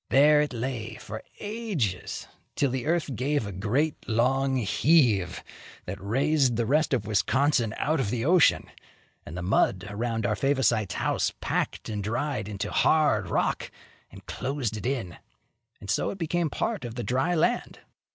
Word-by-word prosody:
There 150 Hz, +2 st, +6 dB
it 150 Hz, -, -1 dB
lay 115 Hz, -3 st, -4 dB
for 110 Hz, +1 st, -8 dB, 0.2 s
ages, 205 Hz, -, -3 dB, 0.3 s
till 140 Hz, -3 st, +1 dB
the 130 Hz, +2 st, -3 dB
earth 160 Hz, -5 st, 0 dB
gave 140 Hz, +1 st, 0 dB
a 100 Hz, -, -5 dB
great, 120 Hz, +12 st, -1 dB
long 135 Hz, +4 st, +2 dB
heave, 115 Hz, -, +2 dB, 0.4 s
that 95 Hz, +1 st, -6 dB
raised 135 Hz, +4 st, +2 dB
the 115 Hz, +1 st, 0 dB
rest 150 Hz, +6 st, +2 dB
of 120 Hz, -6 st, 0 dB
Wisconsin 110 Hz, +4 st, +1 dB
out 155 Hz, +2 st, 0 dB
of 120 Hz, -7 st, 0 dB
the 115 Hz, +2 st, -2 dB
ocean, 175 Hz, 0 st, +4 dB, 0.6 s
and 80 Hz, -, -7 dB
the 90 Hz, -, -4 dB
mud 95 Hz, +1 st, +2 dB
around 115 Hz, +1 st, -2 dB
our 105 Hz, -, +1 dB
Favosites' 125 Hz, -6 st, +1 dB
house -, -, 0 dB
packed -, -, -2 dB
and 105 Hz, -2 st, -3 dB
dried 120 Hz, 0 st, -2 dB
into 100 Hz, 0 st, -4 dB
hard 110 Hz, -, +3 dB
rock -, -, 0 dB, 0.4 s
and -, -, -14 dB
closed 130 Hz, -5 st, -3 dB
it 105 Hz, +1 st, -4 dB
in; 120 Hz, -11 st, -3 dB, 0.6 s
and -, -, -11 dB
so -, -, 0 dB
it -, -, -5 dB
became 170 Hz, -1 st, 0 dB
part 220 Hz, +1 st, -2 dB
of 120 Hz, -1 st, -6 dB
the 120 Hz, -, -3 dB
dry 135 Hz, +10 st, +1 dB
land. 240 Hz, +10 st, 0 dB
125 Hz, 160 wpm, -27 LUFS, 105-150 Hz, 0.6 s, There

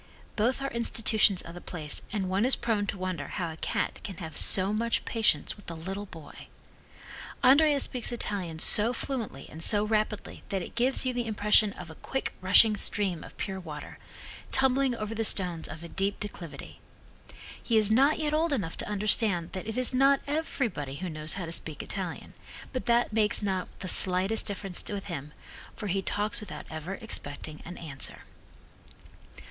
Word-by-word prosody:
Both 250 Hz, +5 st, +1 dB
are 275 Hz, -, -2 dB
institutions 220 Hz, -4 st, +3 dB
of 165 Hz, -, -9 dB
the 175 Hz, -, -9 dB
place 155 Hz, -4 st, -4 dB
and 200 Hz, -3 st, -1 dB
one 190 Hz, +3 st, +1 dB
is, 260 Hz, +2 st, +4 dB
prone 220 Hz, -4 st, -1 dB
to 200 Hz, -, -3 dB
wonder 185 Hz, -6 st, -3 dB
how 170 Hz, -2 st, -3 dB
a -, -, -8 dB
cat -, -, -2 dB
can 195 Hz, -5 st, -6 dB
have 160 Hz, -3 st, -7 dB
so 195 Hz, +2 st, +6 dB
much 230 Hz, +2 st, 0 dB
patience 225 Hz, -2 st, +1 dB
with 205 Hz, -, -11 dB
a 165 Hz, -, -5 dB
little 195 Hz, +5 st, -5 dB
boy. 160 Hz, -5 st, -12 dB, 1.0 s
Andrea 285 Hz, +3 st, +6 dB
speaks 250 Hz, -3 st, 0 dB
Italian 195 Hz, -8 st, -2 dB
so 215 Hz, +8 st, +4 dB
fluently 230 Hz, -, -4 dB
and 160 Hz, +1 st, -9 dB
so 205 Hz, +2 st, +3 dB
rapidly 215 Hz, -1 st, -1 dB
that 190 Hz, -2 st, -1 dB
it -, -, -9 dB
gives 250 Hz, +3 st, +4 dB
you 255 Hz, -, 0 dB
the 240 Hz, -1 st, -2 dB
impression 210 Hz, 0 st, +4 dB
of 175 Hz, -3 st, -9 dB
a 160 Hz, -, -15 dB
quick 265 Hz, -, -3 dB
rushing 205 Hz, +4 st, +6 dB
stream 195 Hz, -5 st, -1 dB
of -, -, -13 dB
pure 190 Hz, -2 st, -4 dB
water, 155 Hz, -5 st, -8 dB, 0.5 s
tumbling 265 Hz, -1 st, +3 dB
over 215 Hz, -1 st, -4 dB
the 225 Hz, 0 st, -1 dB
stones 180 Hz, -6 st, +2 dB
of 155 Hz, +2 st, -9 dB
a 170 Hz, -, -8 dB
steep 195 Hz, +1 st, -1 dB
declivity. 180 Hz, -6 st, -8 dB, 0.8 s
He 230 Hz, -, +1 dB
is 215 Hz, -1 st, +4 dB
not 275 Hz, +7 st, +4 dB
yet 305 Hz, -1 st, -1 dB
old 320 Hz, +1 st, +2 dB
enough 195 Hz, -12 st, -2 dB
to -, -, -5 dB
understand 205 Hz, -4 st, +1 dB
that 190 Hz, +2 st, -6 dB
it 220 Hz, -, -4 dB
is 255 Hz, 0 st, +3 dB
not 275 Hz, +2 st, +5 dB
everybody 245 Hz, -, -2 dB
who 185 Hz, +5 st, -4 dB
knows 155 Hz, 0 st, -2 dB
how 185 Hz, -, -4 dB
to 165 Hz, -, -6 dB
speak 155 Hz, -3 st, -3 dB
Italian, 185 Hz, -4 st, -4 dB, 0.4 s
but 255 Hz, -, -4 dB
that 235 Hz, -1 st, +3 dB
makes 215 Hz, -1 st, +1 dB
not 190 Hz, -2 st, -1 dB
the 185 Hz, -, -4 dB
slightest 185 Hz, +4 st, +4 dB
difference 195 Hz, -3 st, -3 dB
with 200 Hz, -1 st, -4 dB
him, 150 Hz, -5 st, -6 dB, 0.4 s
for 215 Hz, -, -6 dB
he 195 Hz, 0 st, 0 dB
talks 205 Hz, +2 st, -1 dB
without 210 Hz, -, -8 dB
ever 160 Hz, +5 st, -5 dB
expecting 155 Hz, -, -5 dB
an 175 Hz, +1 st, -8 dB
answer. 145 Hz, -5 st, -4 dB
205 Hz, 185 wpm, -28 LUFS, 175-230 Hz, 1.0 s, so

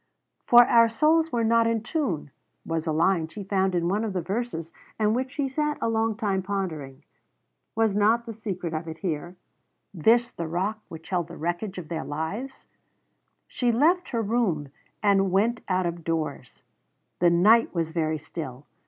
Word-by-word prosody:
"For 240 Hz, 0 st, +8 dB
our 230 Hz, -1 st, +5 dB
souls 315 Hz, +7 st, +2 dB
were 235 Hz, -1 st, 0 dB
not 230 Hz, 0 st, +3 dB
in 230 Hz, -1 st, 0 dB
tune" 225 Hz, -, -2 dB, 0.3 s
was 165 Hz, 0 st, -2 dB
a -, -, +1 dB
line 165 Hz, +1 st, +2 dB
she 200 Hz, +6 st, -8 dB
found 190 Hz, -1 st, 0 dB
in 170 Hz, -1 st, +1 dB
one 205 Hz, +5 st, 0 dB
of 215 Hz, -3 st, -3 dB
the 180 Hz, -, -1 dB
verses 190 Hz, -4 st, -4 dB, 0.2 s
and 215 Hz, -1 st, +2 dB
which 260 Hz, +1 st, -1 dB
she 285 Hz, -2 st, -1 dB
sat 300 Hz, +2 st, -1 dB
a -, -, 0 dB
long 225 Hz, -1 st, +1 dB
time 200 Hz, -4 st, -1 dB
pondering. 160 Hz, -8 st, -4 dB, 0.7 s
Was 220 Hz, -2 st, +2 dB
not 220 Hz, +3 st, +3 dB
the 230 Hz, -, -6 dB
secret 190 Hz, -6 st, -5 dB
of 160 Hz, +1 st, -4 dB
it 160 Hz, 0 st, -6 dB
here? 175 Hz, 0 st, -4 dB, 0.6 s
This 230 Hz, +7 st, +3 dB
the 170 Hz, -, -5 dB
rock 190 Hz, +6 st, -2 dB
which 165 Hz, 0 st, -11 dB
held 175 Hz, -3 st, -1 dB
the 170 Hz, -, -10 dB
wreckage 175 Hz, +4 st, -3 dB
of 175 Hz, -4 st, -6 dB
their 160 Hz, -1 st, -3 dB
lives? 195 Hz, -, -5 dB, 0.8 s
She 245 Hz, -2 st, 0 dB
left 335 Hz, +9 st, +2 dB
her 230 Hz, -3 st, -1 dB
room 200 Hz, -, 0 dB, 0.3 s
and 195 Hz, -2 st, +3 dB
went 220 Hz, +5 st, +2 dB
out 185 Hz, 0 st, +1 dB
of 170 Hz, -1 st, -4 dB
doors. 155 Hz, -6 st, -4 dB, 0.6 s
The 175 Hz, -, +5 dB
night 210 Hz, +7 st, +5 dB
was 165 Hz, -1 st, -1 dB
very 160 Hz, -1 st, 0 dB
still. 145 Hz, -3 st, -8 dB
195 Hz, 180 wpm, -26 LUFS, 165-230 Hz, 0.8 s, For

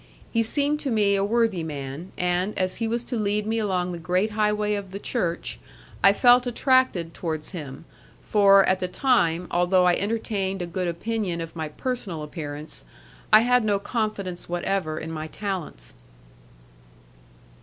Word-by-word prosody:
He 230 Hz, -, +2 dB
seemed 285 Hz, +6 st, +1 dB
to 285 Hz, -, -3 dB
me 210 Hz, -4 st, +2 dB
a 195 Hz, 0 st, +2 dB
worthy 220 Hz, -3 st, +1 dB
man, 145 Hz, +2 st, -6 dB
and 180 Hz, +3 st, 0 dB
as 185 Hz, 0 st, -1 dB
he 225 Hz, -, -1 dB
was 235 Hz, +1 st, -1 dB
to 245 Hz, -, -4 dB
lead 210 Hz, -1 st, 0 dB
me 225 Hz, +1 st, 0 dB
along 185 Hz, -4 st, -1 dB
the 175 Hz, -, -6 dB
great 180 Hz, +6 st, 0 dB
highway 210 Hz, 0 st, +1 dB
of 200 Hz, -2 st, -4 dB
the 195 Hz, +2 st, -6 dB
Church, 175 Hz, -7 st, -2 dB, 0.4 s
I 195 Hz, -, +8 dB
felt 245 Hz, +4 st, +5 dB
attracted 245 Hz, -9 st, +2 dB
towards 160 Hz, -3 st, -4 dB
him, 150 Hz, -4 st, -8 dB, 0.4 s
for, 195 Hz, -2 st, +6 dB
at 185 Hz, 0 st, +2 dB
the 185 Hz, -, -1 dB
time, 180 Hz, -, +1 dB
although 180 Hz, +1 st, +3 dB
I 180 Hz, -, +5 dB
entertained 195 Hz, -2 st, -2 dB
a -, -, -2 dB
good 180 Hz, +1 st, -3 dB
opinion 180 Hz, 0 st, -2 dB
of 165 Hz, 0 st, -6 dB
my 160 Hz, -2 st, -4 dB
personal 190 Hz, -4 st, -4 dB
appearance, 150 Hz, -, -7 dB, 0.5 s
I 215 Hz, -, +9 dB
had 250 Hz, 0 st, +3 dB
no 205 Hz, -2 st, +2 dB
confidence 200 Hz, -5 st, -3 dB
whatever 175 Hz, -2 st, -1 dB
in 160 Hz, +1 st, -5 dB
my 155 Hz, -1 st, -5 dB
talents. 170 Hz, -, -5 dB
195 Hz, 165 wpm, -25 LUFS, 170-220 Hz, 0.5 s, I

